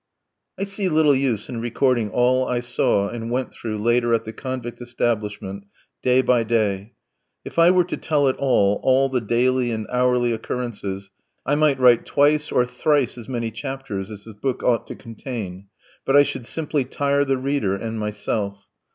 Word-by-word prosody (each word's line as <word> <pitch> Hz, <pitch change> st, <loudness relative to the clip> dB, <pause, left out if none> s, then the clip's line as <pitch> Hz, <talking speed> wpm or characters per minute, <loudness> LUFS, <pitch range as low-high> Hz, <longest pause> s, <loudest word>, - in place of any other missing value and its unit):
I -, -, -2 dB
see 195 Hz, -1 st, -1 dB
little 155 Hz, -2 st, +4 dB
use 130 Hz, -6 st, 0 dB
in 115 Hz, -2 st, -5 dB
recording 120 Hz, -1 st, +1 dB
all 125 Hz, +4 st, +2 dB
I 125 Hz, -, 0 dB
saw 100 Hz, -4 st, +1 dB
and 115 Hz, -1 st, -5 dB
went 125 Hz, +2 st, -2 dB
through 110 Hz, -2 st, -5 dB
later 120 Hz, +2 st, +2 dB
at 115 Hz, -, -2 dB
the 110 Hz, -, -6 dB
convict 125 Hz, -2 st, -6 dB
establishment 105 Hz, -5 st, -3 dB, 0.4 s
day 130 Hz, +1 st, +3 dB
by 120 Hz, -2 st, +3 dB
day. 110 Hz, -1 st, -1 dB, 0.5 s
If -, -, -4 dB
I 165 Hz, +1 st, +7 dB
were 180 Hz, 0 st, +5 dB
to 180 Hz, -, -5 dB
tell 145 Hz, -3 st, +1 dB
it 130 Hz, -, +2 dB
all, 105 Hz, -7 st, +2 dB
all 135 Hz, +1 st, +3 dB
the 130 Hz, -2 st, 0 dB
daily 125 Hz, +3 st, +1 dB
and 110 Hz, -2 st, -3 dB
hourly 125 Hz, -1 st, +2 dB
occurrences, 100 Hz, -5 st, -5 dB, 0.3 s
I 145 Hz, -, +1 dB
might 145 Hz, -2 st, +3 dB
write 125 Hz, -2 st, +5 dB
twice 150 Hz, +1 st, +2 dB
or 125 Hz, -, +3 dB
thrice 130 Hz, +1 st, +1 dB
as 120 Hz, 0 st, -10 dB
many 115 Hz, -3 st, -2 dB
chapters 115 Hz, -5 st, -5 dB
as 105 Hz, -2 st, -8 dB
this 110 Hz, -, -10 dB
book 125 Hz, +5 st, -3 dB
ought 120 Hz, -3 st, +1 dB
to -, -, -7 dB
contain, 110 Hz, -5 st, -7 dB, 0.4 s
but 135 Hz, -, +1 dB
I 145 Hz, -, +8 dB
should 120 Hz, -4 st, -5 dB
simply 150 Hz, -3 st, -1 dB
tire 140 Hz, +2 st, 0 dB
the 135 Hz, -1 st, 0 dB
reader 130 Hz, -7 st, 0 dB
and 110 Hz, +2 st, -4 dB
myself. 105 Hz, -1 st, -3 dB
120 Hz, 180 wpm, -22 LUFS, 110-135 Hz, 0.5 s, I